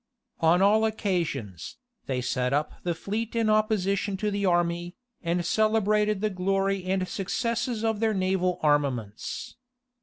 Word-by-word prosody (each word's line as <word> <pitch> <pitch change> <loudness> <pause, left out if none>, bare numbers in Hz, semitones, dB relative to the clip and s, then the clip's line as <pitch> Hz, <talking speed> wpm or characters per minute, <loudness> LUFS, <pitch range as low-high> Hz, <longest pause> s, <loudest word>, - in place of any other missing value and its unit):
On 170 +3 +4
all 215 +2 +5
occasions, 165 - -2 0.3
they 130 -2 -1
set 125 +1 -1
up 150 +2 0
the 175 -1 -1
fleet 215 +7 -4
in 225 -2 +2
opposition 205 -2 +1
to 210 +2 -1
the 200 -1 0
army, 175 0 0 0.3
and 175 0 -1
celebrated 215 0 +2
the 215 0 0
glory 195 0 0
and 185 0 0
successes 230 +4 -2
of 220 -2 0
their 220 -1 +1
naval 185 -1 0
armaments. 135 - -1
190 Hz, 140 wpm, -27 LUFS, 170-215 Hz, 0.3 s, all